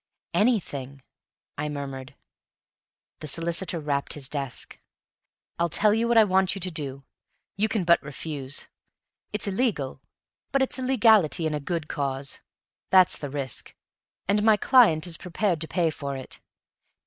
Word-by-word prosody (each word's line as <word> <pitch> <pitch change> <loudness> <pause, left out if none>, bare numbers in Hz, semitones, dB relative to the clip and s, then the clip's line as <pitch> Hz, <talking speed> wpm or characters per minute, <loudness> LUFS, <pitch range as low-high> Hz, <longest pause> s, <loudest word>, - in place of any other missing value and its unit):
"Anything," 140 - 0 0.6
I 150 +1 -1
murmured. 140 -1 -6 1.0
The 155 - -7
solicitor 170 +3 0
rapped 145 -2 -1
his 140 -3 -1
desk. 135 -3 -4 0.8
"I'll 170 0 +2
tell 210 +6 +3
you 230 +2 +1
what 235 0 +3
I 225 - +9
want 190 -1 +2
you - - -5
to 185 +1 -1
do. 140 -4 -4 0.5
You 215 +2 +1
can 215 -4 0
but 170 0 +4
refuse. 145 -1 -4 0.6
It's 210 - -2
illegal, 195 - -1 0.5
but 275 -1 +3
it's 265 - -3
illegality 220 - +4
in 155 - 0
a 150 - -1
good 160 +1 -3
cause; 140 -1 -2 0.5
that's 185 -2 +6
the 145 - -6
risk, 135 -3 -6 0.5
and 205 +2 +3
my 215 0 +5
client 205 - +5
is 170 -2 -3
prepared 180 -2 -1
to 160 - -2
pay 170 -2 +1
for 140 -2 -5
it. 130 - -8
165 Hz, 150 wpm, -26 LUFS, 140-205 Hz, 1.0 s, I